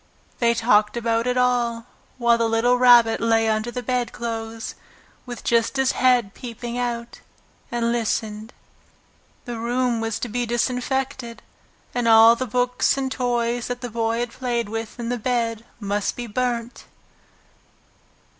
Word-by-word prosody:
They 235 -1 +3
talked 215 -1 +3
about 230 0 0
it 250 0 0
all, 240 -2 +1 0.3
while 235 -1 +3
the 230 -1 +1
little 230 +2 +3
Rabbit 240 -2 +6
lay 225 -1 +2
under 215 +1 0
the 245 +1 -5
bedclothes, 230 -2 -3 0.5
with 245 -1 -7
just 235 +3 +1
his 265 -1 +3
head 245 -6 +2
peeping 240 -1 -7
out, 240 -1 -3 0.5
and 235 -1 0
listened. 220 -1 -2 0.9
The 240 -2 -5
room 240 0 0
was 225 -1 -2
to - - -2
be 240 +2 -2
disinfected, 250 0 -2 0.5
and 245 -1 0
all 225 +1 +8
the 255 +2 -3
books 250 +3 +1
and 265 -1 -2
toys 240 -1 -1
that 245 0 -4
the 245 -2 -5
Boy 230 +1 -1
had 240 -1 -3
played 240 -4 -2
with 225 +2 -5
in 240 +1 -2
bed 230 -1 -1
must 205 -1 -2
be 245 - -5
burnt. 240 +1 -3
235 Hz, 145 wpm, -23 LUFS, 225-245 Hz, 0.9 s, all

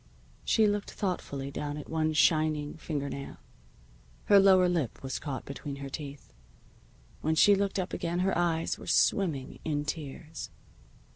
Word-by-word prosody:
She 220 - +3
looked 205 -1 0
thoughtfully 140 -8 -3
down 145 +1 -4
at 150 - -7
one 155 -1 0
shining 155 -1 +2
finger 150 -3 -4
nail. 140 0 -6 0.9
Her 200 -1 +7
lower 190 -2 +6
lip 165 -11 -1
was 130 -1 -3
caught 140 -4 -5
between 140 0 -6
her 140 0 -7
teeth. 140 0 -8 0.9
When 160 +1 +1
she 205 +5 +7
looked 200 0 0
up 185 -1 -2
again 175 +1 -1
her 190 +1 +1
eyes 165 -2 0
were - - -10
swimming 160 -10 +1
in 150 -2 -1
tears. 150 +1 -6
155 Hz, 150 wpm, -29 LUFS, 145-180 Hz, 0.9 s, Her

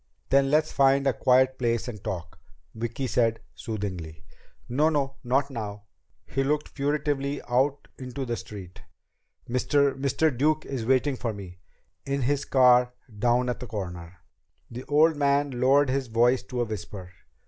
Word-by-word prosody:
"Then 135 0 +4
let's 155 +2 +2
find 135 0 +3
a 135 - +3
quiet 130 +2 +3
place 115 -1 0
and 105 -5 -7
talk," 85 -4 -5 0.3
Vicki 120 +4 -4
said 115 -2 +1
soothingly. 90 -8 -6 0.4
"No, 145 +6 +2
no. 140 -3 -1
Not 135 +3 +1
now." 105 -4 -6 0.4
He 135 - -1
looked 150 +2 -1
furtively 145 -1 -1
out 135 +4 +1
into 130 +1 -5
the 120 -1 -2
street. 95 -5 -10 0.7
"Mr. 140 +3 +2
Mr. 140 +2 +1
Duke 155 +4 +1
is 125 -5 -4
waiting 130 +2 +2
for 115 -3 -3
me. 90 -3 -10 0.4
In 140 -1 -2
his 140 +2 0
car 125 -1 +5 0.3
down 120 +3 +2
at 125 - -2
the 125 - -7
corner." 90 -5 -6 0.5
The 125 +2 -7
old 155 +2 +3
man 140 0 +2
lowered 135 +1 +4
his 135 -1 -1
voice 120 +3 +3
to 125 -2 -3
a - - +1
whisper. 100 -4 -7
130 Hz, 155 wpm, -26 LUFS, 115-140 Hz, 0.7 s, car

